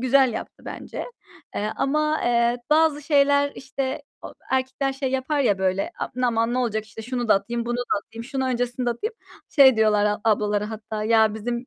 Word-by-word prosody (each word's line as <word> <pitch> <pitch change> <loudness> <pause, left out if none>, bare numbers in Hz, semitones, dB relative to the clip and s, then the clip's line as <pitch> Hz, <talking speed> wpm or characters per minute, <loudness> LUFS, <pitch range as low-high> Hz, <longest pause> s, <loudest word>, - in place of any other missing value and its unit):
güzel 260 -1 +4
yaptı - - -7
bence, - - -6 0.5
eee, 210 +1 -2
ama, 305 +2 +1
eee, 235 0 +2
bazı 305 -1 +3
şeyler 285 -1 +3
işte, 265 +1 -4 0.2
o - - -9 0.2
erkekler 265 +1 0
şey 265 -1 -3
yapar 265 +3 0
ya 205 -7 +2
böyle, 190 +1 0 0.3
"Aman, 230 0 +1
ne - - 0
olacak 220 -3 -1
işte 225 0 -10
şunu 245 0 -3
da - - +7
atayım, 235 +4 -2
bunu 240 0 -1
da 245 - -1 0.2
atayım, 225 +3 -10
şunu 265 +1 -2
öncesinde 245 0 -1
atayım." 430 - -4 0.3
Şey 265 -5 +6
diyorlar 210 -1 +3
a 210 0 0
ablalara 210 -1 +1
hatta 215 -1 -5
"Ya 220 -1 +4
bizim 235 +3 -4
240 Hz, 180 wpm, -24 LUFS, 220-270 Hz, 0.5 s, da